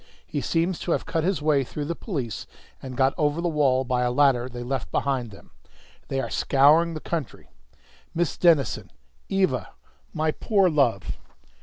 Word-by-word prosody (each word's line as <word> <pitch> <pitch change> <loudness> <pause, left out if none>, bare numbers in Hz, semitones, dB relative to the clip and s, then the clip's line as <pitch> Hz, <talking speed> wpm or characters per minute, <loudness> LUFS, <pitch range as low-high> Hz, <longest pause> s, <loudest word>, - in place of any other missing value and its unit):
He 145 - -3
seems 170 +3 0
to 170 - -1
have - - -2
cut 160 - -1
his 185 -3 0
way 150 -3 +3
through 145 +3 -5
the 170 - -2
police 140 - -5 0.3
and 130 -2 -7
got 135 0 +3
over 150 +1 +1
the 175 - 0
wall 140 -5 +2
by 125 -1 0
a 125 - +2
ladder 130 -2 +3
they 120 -1 -7
left 130 0 -3
behind 130 -4 -1
them. 100 - -15 0.6
They 135 - -2
are - - -3
scouring 155 +5 +4
the - - -4
country 155 -4 -5 0.6
Miss 170 -2 0
Denison! 160 -9 +2 0.4
Eva! 190 -10 0 0.4
My 155 0 0
poor 195 0 +2
love!" 125 -10 +1
145 Hz, 170 wpm, -25 LUFS, 130-165 Hz, 0.6 s, scouring